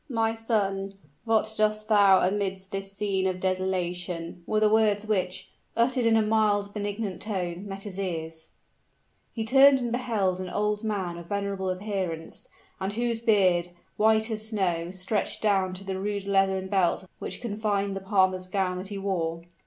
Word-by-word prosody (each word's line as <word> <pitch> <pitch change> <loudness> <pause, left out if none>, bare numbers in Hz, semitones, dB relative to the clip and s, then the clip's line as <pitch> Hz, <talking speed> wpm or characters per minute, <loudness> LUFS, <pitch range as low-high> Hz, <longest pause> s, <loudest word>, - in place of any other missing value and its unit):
"My 225 -3 +1
son, 200 -4 -1 0.3
what 220 -1 +2
dost 215 0 +1
thou 200 -4 +6
amidst 190 -1 -2
this 195 0 -4
scene 195 -1 0
of 185 -1 -2
desolation?" 180 -2 -2
were 215 - +2
the 215 - +4
words 215 -1 +3
which, 185 -3 -2 0.3
uttered 240 0 +2
in 225 -1 +5
a 220 - +3
mild 210 -2 +2
benignant 205 -2 -3
tone, 185 -2 -3
met 195 0 -7
his 195 -2 -6
ears. 160 -4 -4 0.8
He 225 -2 -3
turned 270 +3 +7
and 240 -2 -3
beheld 220 -7 0
an 185 -1 -4
old 210 +2 -1
man 190 -6 -2
of 170 - -11
venerable 200 -1 -2
appearance, 185 -4 -4 0.3
and 190 +1 -2
whose 235 0 -1
beard, 185 -6 +3 0.3
white 220 +1 +3
as 215 0 -1
snow, 175 -6 0
stretched 190 +3 -2
down 190 -3 +2
to 190 - -8
the 190 -1 -4
rude 200 0 -3
leathern 195 -1 +2
belt 190 -1 +1
which - - -5
confined 205 -3 -1
the 195 - -4
palmer's 190 -2 +2
gown 185 -1 -1
that 190 - -6
he 200 0 -5
wore. 170 -4 -2
195 Hz, 165 wpm, -27 LUFS, 185-215 Hz, 0.8 s, turned